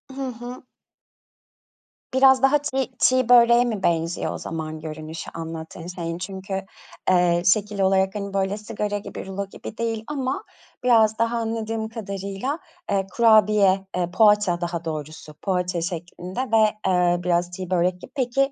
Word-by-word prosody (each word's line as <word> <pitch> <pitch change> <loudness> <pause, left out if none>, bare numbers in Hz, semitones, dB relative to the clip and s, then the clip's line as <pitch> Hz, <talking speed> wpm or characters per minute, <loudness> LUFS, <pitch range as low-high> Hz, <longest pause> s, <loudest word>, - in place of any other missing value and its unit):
Hı 270 -1 -3
hı. 245 +2 -9 1.5
Biraz 265 0 +6
daha 280 +2 +6
çiğ 270 -3 -2
çiğ 255 -1 +3
böreğe 240 0 +7
mi 215 -5 -3
benziyor 165 0 0
o - - -5
zaman 155 -1 -5
görünüşü 155 +1 -7
anlattığın 165 +1 -7
şeyin? 170 -2 -4
Çünkü, 190 +1 -6 0.6
eee, 175 -1 +4
şekil 205 +2 +2
olarak, 190 +1 +2
hani, 200 -1 -4
böyle, 195 +1 0
sigara 210 -1 -3
gibi, 205 - -7
rulo 195 +1 -4
gibi 200 - -10
değil 225 -1 -2
ama 270 -3 -2 0.4
biraz 225 -3 +4
daha, 230 +1 +1
anladığım 225 -1 -2
kadarıyla, 200 - -4 0.3
eee, 195 -1 +1
kurabiye, 210 -4 +4
eee, 175 -1 -1
poğaça 210 -4 +4
daha 170 -1 -3
doğrusu, 155 0 -6
poğaça 180 -3 -1
şeklinde 175 +2 -5
ve, 220 -4 +3
eee, 180 -1 +3
biraz 175 0 +1
çiğ 185 0 -6
börek 180 0 +1
gibi. - - -11
Peki, 270 +1 +1
195 Hz, 145 wpm, -23 LUFS, 175-230 Hz, 1.5 s, böreğe